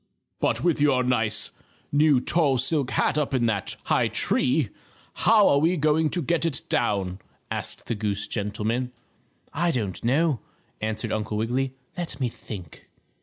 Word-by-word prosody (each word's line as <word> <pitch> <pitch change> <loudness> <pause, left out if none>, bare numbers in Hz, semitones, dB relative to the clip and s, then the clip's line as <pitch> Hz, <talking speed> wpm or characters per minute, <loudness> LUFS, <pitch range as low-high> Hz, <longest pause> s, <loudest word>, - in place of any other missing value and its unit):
"But - - 0
with 170 -4 +2
your 135 -3 +4
nice, 110 -4 0 0.4
new 145 -2 +4
tall 140 0 +2
silk 135 +1 +2
hat 145 +2 +1
up 140 -2 -1
in 120 -2 +2
that 100 -4 0
high - - +2
tree, 130 -2 +1 0.4
how 215 -2 +5
are 140 - +4
we 165 +4 +3
ever 180 - -2
going 155 +1 +3
to 175 0 0
get 170 +4 0
it 160 -5 -1
down," 100 -5 0 0.3
asked - - -5
the - - -2
goose 105 -2 -2
gentleman. 110 +4 -2 0.6
"I 170 +3 +1
don't 110 - -2
know," 140 +2 +2 0.4
answered 110 +1 -2
Uncle 105 -1 -2
Wiggily. 130 +4 -1 0.2
"Let 170 -6 -5
me 125 -3 0
think." 95 -7 -10
130 Hz, 160 wpm, -25 LUFS, 110-150 Hz, 0.6 s, how